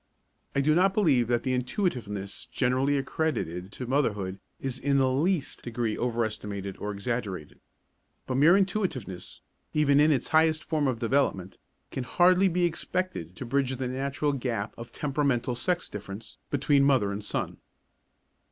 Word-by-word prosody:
I 140 Hz, -, +3 dB
do 155 Hz, +2 st, +3 dB
not 190 Hz, +4 st, +3 dB
believe 140 Hz, -, +3 dB
that 120 Hz, -1 st, +1 dB
the 130 Hz, -, 0 dB
intuitiveness 125 Hz, -, -2 dB
generally 130 Hz, +2 st, +2 dB
accredited 115 Hz, -, -2 dB
to 125 Hz, -, -5 dB
motherhood 105 Hz, -8 st, 0 dB, 0.2 s
is 135 Hz, -1 st, -3 dB
in 140 Hz, 0 st, +2 dB
the 130 Hz, -1 st, +3 dB
least 155 Hz, +3 st, 0 dB
degree 115 Hz, -2 st, -2 dB
overestimated 105 Hz, -5 st, -2 dB
or 105 Hz, -, -4 dB
exaggerated. 100 Hz, -6 st, -4 dB, 0.7 s
But 130 Hz, -, -1 dB
mere 165 Hz, +7 st, +7 dB
intuitiveness, 185 Hz, -, -2 dB, 0.3 s
even 145 Hz, -2 st, +4 dB
in 150 Hz, +1 st, +5 dB
its 135 Hz, -5 st, 0 dB
highest 160 Hz, 0 st, +3 dB
form 155 Hz, -3 st, 0 dB
of 130 Hz, -3 st, 0 dB
development, 115 Hz, -6 st, 0 dB, 0.3 s
can 130 Hz, -, -3 dB
hardly 180 Hz, +7 st, +4 dB
be 180 Hz, 0 st, +1 dB
expected 170 Hz, -, -3 dB
to 130 Hz, -, -6 dB
bridge 135 Hz, +1 st, 0 dB
the 130 Hz, 0 st, -3 dB
natural 140 Hz, +3 st, -1 dB
gap 120 Hz, -6 st, -2 dB
of 115 Hz, 0 st, -9 dB
temperamental 135 Hz, -4 st, 0 dB
sex 175 Hz, +9 st, -1 dB
difference 105 Hz, +1 st, -8 dB
between 140 Hz, 0 st, +3 dB
mother 130 Hz, -8 st, +3 dB
and 100 Hz, +1 st, -4 dB
son. -, -, -3 dB
130 Hz, 150 wpm, -28 LUFS, 115-150 Hz, 0.7 s, mere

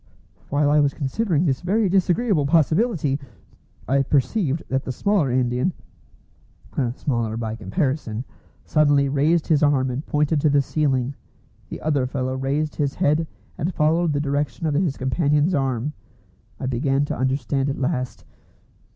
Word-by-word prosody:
While 145 Hz, 0 st, +2 dB
I 150 Hz, -, +5 dB
was 140 Hz, -1 st, +2 dB
considering 165 Hz, +3 st, 0 dB
this 135 Hz, -5 st, 0 dB
very 200 Hz, +4 st, +1 dB
disagreeable 185 Hz, -, +2 dB
possibility, 160 Hz, -, +2 dB, 0.7 s
I 135 Hz, +3 st, +3 dB
perceived 145 Hz, -, 0 dB
that 135 Hz, 0 st, -1 dB
the -, -, -4 dB
smaller 195 Hz, 0 st, +1 dB
Indian 125 Hz, +6 st, +1 dB, 1.2 s
(smaller 115 Hz, -6 st, -2 dB
by 110 Hz, -2 st, -3 dB
comparison) 125 Hz, -, -2 dB, 0.4 s
suddenly 145 Hz, -2 st, +3 dB
raised 150 Hz, +4 st, +2 dB
his 155 Hz, -3 st, +2 dB
arm 135 Hz, -3 st, +2 dB
and 130 Hz, +4 st, -4 dB
pointed 150 Hz, 0 st, +1 dB
to 155 Hz, -, +3 dB
the 140 Hz, -1 st, +3 dB
ceiling. 135 Hz, -3 st, 0 dB, 0.6 s
The -, -, -7 dB
other 145 Hz, -4 st, +1 dB
fellow 130 Hz, -1 st, -2 dB
raised 140 Hz, +3 st, -2 dB
his 140 Hz, -2 st, -1 dB
head 155 Hz, +3 st, +1 dB, 0.3 s
and 175 Hz, +5 st, -2 dB
followed 160 Hz, +2 st, +2 dB
the 145 Hz, -, 0 dB
direction 145 Hz, -1 st, -2 dB
of 155 Hz, -, +1 dB
his 150 Hz, -2 st, 0 dB
companion's 150 Hz, +5 st, +1 dB
arm. 135 Hz, -1 st, -1 dB, 0.7 s
I -, -, -4 dB
began 135 Hz, +2 st, +1 dB
to -, -, -3 dB
understand 135 Hz, +1 st, 0 dB
at 140 Hz, -, -3 dB
last. 130 Hz, -2 st, -2 dB
145 Hz, 145 wpm, -23 LUFS, 130-155 Hz, 1.2 s, I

